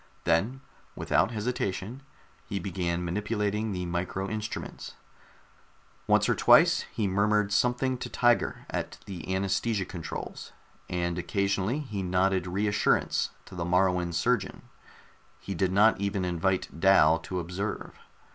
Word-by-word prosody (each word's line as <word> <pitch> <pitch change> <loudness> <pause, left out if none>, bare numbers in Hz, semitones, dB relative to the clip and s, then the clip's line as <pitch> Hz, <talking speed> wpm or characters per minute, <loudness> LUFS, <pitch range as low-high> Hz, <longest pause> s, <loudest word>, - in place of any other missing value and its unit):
Then, 100 +11 +1 0.3
without 95 - +2
hesitation, 110 0 -3 0.4
he 100 - -4
began 90 -3 -2
manipulating 105 +3 -1
the 90 -2 -3
micro 90 +2 -2
instruments. 110 +1 -5 1.1
Once - - +4
or - - +3
twice - - +5
he 105 - -1
murmured 105 +1 +2
something 125 +4 +1
to - - -5
Tiger 120 -1 +1
at - - -4
the 90 -5 -7
anaesthesia 100 +1 0
controls, 85 -3 -7 0.4
and 85 0 -1
occasionally 100 - 0
he 110 -9 -4
nodded 95 0 +1
reassurance 100 +3 +1 0.2
to - - -14
the 90 -2 -3
Moruan 90 0 +2
surgeon. 120 +5 0 0.7
He 100 - -6
did 95 +1 0
not 100 +1 +4
even 100 -2 -1
invite 90 0 -1
Dal 85 -4 +5
to 90 +2 -4
observe. 90 +5 -5
95 Hz, 125 wpm, -28 LUFS, 90-105 Hz, 1.1 s, twice